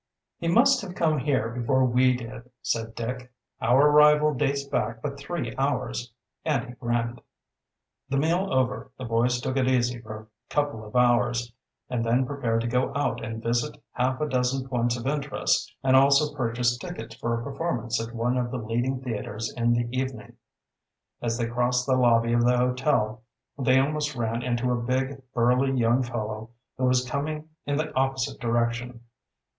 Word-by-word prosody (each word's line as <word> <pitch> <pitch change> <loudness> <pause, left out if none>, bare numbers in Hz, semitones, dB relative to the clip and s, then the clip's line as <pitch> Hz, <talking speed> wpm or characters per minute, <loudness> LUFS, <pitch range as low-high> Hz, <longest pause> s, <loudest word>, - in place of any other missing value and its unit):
"He 170 - -3
must 255 +8 +5
have 180 -2 -7
come 155 -4 +2
here 130 -4 0
before 125 +2 +1
we 125 0 +3
did," 125 0 -9
said 115 -1 -2
Dick. 125 +2 -5 0.3
"Our 135 +5 +5
arrival 150 0 +6
dates 140 +1 0
back 115 -4 -2
but 140 +2 -5
three 140 -6 -4
hours," 135 -3 -1 0.3
and 140 -6 0
he 120 - -9
grinned. 120 0 -2 0.9
The 140 - 0
meal 170 +7 +1
over 130 -1 0
the 130 - -6
boys 120 +2 +1
took 130 +2 -2
it 130 -1 +2
easy 125 -2 +1
for 110 -2 -7
a 110 - -16 0.2
couple 145 -7 -1
of 105 +2 -12
hours, 120 -1 +2 0.3
and 125 -2 -1
then 120 +3 +2
prepared 125 -5 -1
to 115 - -2
go 125 +2 +1
out 145 - -1
and 110 0 -5
visit 120 +5 -1
half 130 +1 0
a 150 - 0
dozen 130 0 0
points 120 -2 0
of 120 - -7
interest 145 +1 0
and 130 0 +4
also 140 +2 +5
purchase 120 -1 0
tickets 150 -12 -7
for 115 0 -2
a - - -6
performance 125 -5 -2
at 115 +1 -6
one 120 +2 0
of 120 -1 -1
the 125 - -3
leading 120 +3 -1
theaters 110 -2 -4
in 120 -1 +2
the 120 0 0
evening. 130 -5 -4 0.9
As 115 -1 -1
they 120 - 0
crossed 125 +1 0
the 130 - +2
lobby 115 -2 +3
of 120 0 +3
the 125 +1 +4
hotel 125 -3 +1 0.3
they 130 -1 +3
almost 150 +1 0
ran 115 -1 -1
into 125 0 0
a 120 -1 0
big, 130 +3 -1
burly 125 +3 +3
young 120 +2 +3
fellow 110 -2 -4 0.3
who 130 - +2
was 125 0 +2
coming 150 +2 -3 0.2
in 145 0 0
the 155 0 -2
opposite 130 0 0
direction. 120 +1 -1
125 Hz, 175 wpm, -26 LUFS, 120-135 Hz, 0.9 s, arrival